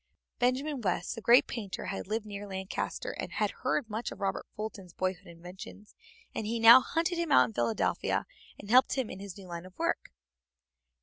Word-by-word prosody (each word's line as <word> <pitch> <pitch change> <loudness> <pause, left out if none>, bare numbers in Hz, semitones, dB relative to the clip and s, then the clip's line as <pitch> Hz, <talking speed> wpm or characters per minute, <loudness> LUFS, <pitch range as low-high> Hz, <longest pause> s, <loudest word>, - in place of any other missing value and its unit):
Benjamin 260 +3 0
West, 180 -4 -1
the 225 - -7
great 240 +3 +6
painter, 210 -6 -5
had 195 - -4
lived 215 +1 -2
near 205 -1 -7
Lancaster, 190 - -4
and - - -4
had - - 0
heard 265 - 0
much 220 +2 -4
of - - -9
Robert 195 -1 -2
Fulton's 205 -4 -6
boyhood 185 0 -3
inventions, 180 +4 -11 0.4
and 215 - -3
he 230 +1 -1
now 230 +3 +10
hunted 335 +4 -1
him 340 -2 -1
out 130 - +7
in 115 - -8
Philadelphia, 115 -1 0 0.3
and 205 +1 -8
helped 255 +2 +6
him 260 -4 -1
in 190 - -8
his 200 -1 -8
new 195 - -11
line 170 -1 -6
of 185 - -18
work. - - -1
205 Hz, 190 wpm, -30 LUFS, 185-240 Hz, 0.4 s, now